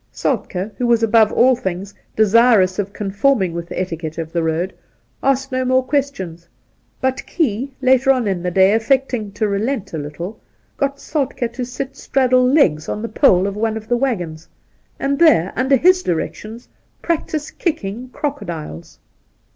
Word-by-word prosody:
Soltk4 190 +4 -2
who 245 - +1
was 235 -1 +3
above 225 -1 +4
all 255 +1 +4
things 195 -2 -5 0.2
desirous 215 -3 +4
of 200 0 -2
conforming 200 -1 0
with 170 0 -5
the - - -4
etiquette 165 -4 -4
of 165 -1 -5
the 170 - +1
road, 165 +3 -1 0.5
asked 270 0 0
no 255 0 0
more 255 0 +2
questions; 190 - -2 0.5
but 260 0 -1
Key, 270 - -1
later 260 +1 +4
on 255 -5 +3
in 190 -3 -1
the 180 - -1
day, 190 +2 +4
affecting 230 -2 0
to 210 +1 0
relent 205 +1 -2
a 160 - -2
little, 160 +8 -7 0.4
got 280 0 -1
Soltk^ 275 -5 -3
to 255 - -4
sit 260 +2 -5
straddle 255 -2 +2
legs 250 - +3
on 210 - -3
the 230 - -3
pole 195 -7 +4
of 200 0 -3
one 220 +1 -1
of 220 0 -9
the 240 - +1
waggons, 180 -11 -2 0.5
and 275 0 -1
there, 290 - +4
under 265 +3 +3
his 365 +7 +4
directions, 215 - -4 0.4
practise 310 -2 -2
kicking 245 - -3
crocodiles. 170 - -6
225 Hz, 165 wpm, -19 LUFS, 185-265 Hz, 0.5 s, above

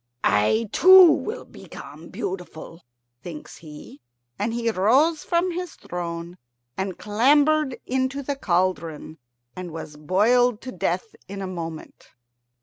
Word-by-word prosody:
"I 105 - +2
too 370 -2 +8
will 435 +10 -3
become - - -12
beautiful," 175 -2 -7 0.4
thinks 165 -4 -9
he, 150 -2 -12 0.4
and 210 +3 -1
he 235 0 -2
rose 270 - +2
from 350 +1 0
his 355 -1 -5
throne 170 0 -6 0.4
and 190 -1 -4
clambered 285 +6 +2
into 260 +2 -1
the 285 +1 -2
cauldron, 170 - -2 0.4
and 185 -1 -6
was 155 -2 -8
boiled 215 +9 +2
to 255 - -7
death 445 - -2
in 200 +1 -7
a 195 - -4
moment. 165 -4 -7
205 Hz, 125 wpm, -24 LUFS, 170-280 Hz, 0.4 s, too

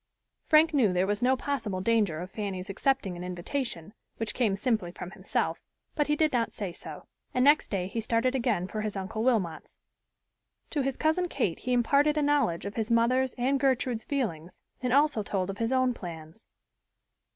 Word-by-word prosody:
Frank 315 0 +4
knew 245 -9 +4
there 180 +1 +2
was 205 +2 -1
no 260 +2 +3
possible 225 -9 -2
danger 200 -6 +1
of 180 +1 -7
Fanny's 195 -2 -4
accepting 200 -4 0
an 175 - -7
invitation, 180 - -4 0.2
which 225 -1 -2
came 220 -6 +1
simply 215 -4 0
from 180 0 -8
himself, - - -2 0.3
but 295 -2 0
he 300 - +2
did 310 -1 +2
not 235 -2 0
say 195 -4 -4
so, - - -10 0.3
and 255 +1 +3
next 295 +2 +5
day 190 -3 -1
he 225 +4 -3
started 230 +3 +1
again 230 -9 0
for 215 +2 -4
his 215 -1 -3
Uncle 195 +3 -4
Wilmot's. 195 -11 0 0.9
To 295 - 0
his 270 -1 -2
cousin 320 +3 +1
Kate 235 - -1
he 250 - -3
imparted 280 +5 +3
a 300 - +2
knowledge 285 -13 +1
of 200 +2 -6
his 225 +1 -1
mother's 250 +3 +2
and 265 +2 +1
Gertrude's 255 -4 +1
feelings 185 - -3 0.2
and 250 -2 -1
also 285 -3 +3
told 195 -2 -2
of 195 - -10
his 230 +1 0
own 255 -1 +2
plans. 165 -1 -9
230 Hz, 185 wpm, -28 LUFS, 190-265 Hz, 0.9 s, next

